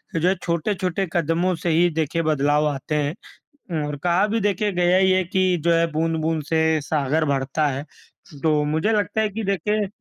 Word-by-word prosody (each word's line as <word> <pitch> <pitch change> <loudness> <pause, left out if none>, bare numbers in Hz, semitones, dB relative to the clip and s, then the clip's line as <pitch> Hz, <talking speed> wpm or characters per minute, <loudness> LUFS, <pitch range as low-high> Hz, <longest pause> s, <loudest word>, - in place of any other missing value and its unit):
जो 165 +2 +1
है 190 - +3
छोटे-छोटे 180 +2 -1
कदमों 170 +2 +1
से 175 - 0
ही 170 +2 +3
देखिए 160 +2 0
बदलाव 150 -1 +2
आते 145 +1 -3
हैं, 145 0 0 0.6
अम, 160 -3 -1
और 150 0 -4
कहा 180 +4 +2
भी 225 +2 0
देखिए 205 +1 0
गया 180 0 +2
ही 190 0 +4
है 185 0 +3
कि 185 0 +1
जो 170 - +3
है 165 0 +3
बूँद-बूँद 160 0 -1
से 160 -1 +2 0.2
सागर 150 +1 0
भरता 135 +3 0
है। 140 +1 -3 0.6
तो 155 -2 +2
मुझे 160 +8 0
लगता 215 0 0
है 215 - +1
कि 220 +2 -5
देखिए 205 +2 0
165 Hz, 190 wpm, -22 LUFS, 155-185 Hz, 0.6 s, ही